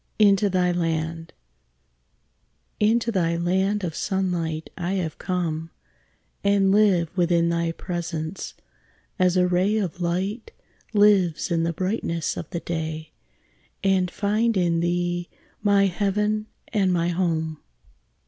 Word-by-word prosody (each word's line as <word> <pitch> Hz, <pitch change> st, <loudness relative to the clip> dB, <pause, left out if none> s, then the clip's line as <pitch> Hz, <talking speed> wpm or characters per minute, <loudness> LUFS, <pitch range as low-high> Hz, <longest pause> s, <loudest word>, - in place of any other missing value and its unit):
INTO 205 Hz, -1 st, +4 dB
THY 180 Hz, -1 st, +2 dB
LAND 165 Hz, -1 st, -2 dB, 1.5 s
Into 230 Hz, +2 st, +2 dB
thy 170 Hz, -5 st, +1 dB
land 190 Hz, +4 st, +1 dB
of 170 Hz, -3 st, -2 dB
sunlight 175 Hz, -4 st, -2 dB
I 175 Hz, +1 st, -2 dB
have 175 Hz, -5 st, -3 dB
come, 165 Hz, -3 st, -2 dB, 0.7 s
And 200 Hz, -1 st, +3 dB
live 195 Hz, -5 st, +3 dB
within 170 Hz, -2 st, +2 dB
thy 170 Hz, -1 st, 0 dB
presence, 170 Hz, -1 st, -5 dB, 0.6 s
as 185 Hz, 0 st, +3 dB
a 180 Hz, -, +4 dB
ray 185 Hz, +4 st, +2 dB
Of 180 Hz, -4 st, -3 dB
light 190 Hz, +6 st, -2 dB, 0.4 s
lives 195 Hz, -5 st, +3 dB
in 165 Hz, -1 st, +2 dB
the 165 Hz, +1 st, 0 dB
brightness 175 Hz, -3 st, -2 dB
of 165 Hz, -, -6 dB
the 170 Hz, -, -4 dB
day; 160 Hz, -2 st, -4 dB, 0.7 s
And 190 Hz, -2 st, +2 dB
find 215 Hz, +4 st, +1 dB
in 170 Hz, -2 st, +2 dB
thee 175 Hz, 0 st, -1 dB, 0.3 s
my 200 Hz, -1 st, +4 dB
heaven 210 Hz, +3 st, 0 dB, 0.2 s
and 195 Hz, -4 st, +2 dB
my 170 Hz, -1 st, +1 dB
home. 160 Hz, -3 st, -1 dB
180 Hz, 120 wpm, -24 LUFS, 170-200 Hz, 1.5 s, INTO